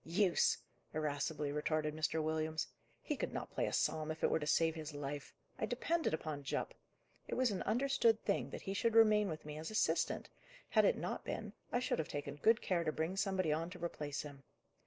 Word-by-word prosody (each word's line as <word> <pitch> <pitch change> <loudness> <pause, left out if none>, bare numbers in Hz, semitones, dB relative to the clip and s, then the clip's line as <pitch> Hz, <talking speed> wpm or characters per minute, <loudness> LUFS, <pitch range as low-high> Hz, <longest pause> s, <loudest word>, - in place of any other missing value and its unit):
"Use!" 180 +2 +3 0.4
irascibly 150 -1 -1
retorted 150 +1 0
Mr. 155 0 0
Williams, 155 0 0 0.4
"he - - -1
could - - -3
not - - -4
play - - 0
a - - -2
psalm 155 -1 +1
if 160 0 -5
it - - +4
were - - +3
to 150 - -4
save 165 +1 +3
his 155 -2 -6
life. 145 0 -4 0.3
I 220 - 0
depended 320 +8 0
upon 155 -2 -3
Jupp. 140 - -2 0.5
It - - -2
was 255 -3 +3
an 195 - -2
understood 240 -3 +3
thing 200 - +1
that - - -7
he 195 - -2
should 225 +3 +1
remain 215 -2 +6
with 155 -2 -5
me 150 0 -6
as 160 - -5
assistant; 215 - +1 0.4
had - - +5
it - - +4
not - - -3
been, - - -4 0.2
I 245 - +2
should 250 - 0
have 160 - -1
taken 145 0 -4
good 225 +8 +4
care 175 -3 +1
to 155 - +1
bring 160 +4 -1
somebody 190 -5 +1
on 165 +2 -1
to 180 -2 -5
replace 150 -4 -3
him. 145 -2 -9
160 Hz, 210 wpm, -37 LUFS, 150-205 Hz, 0.5 s, remain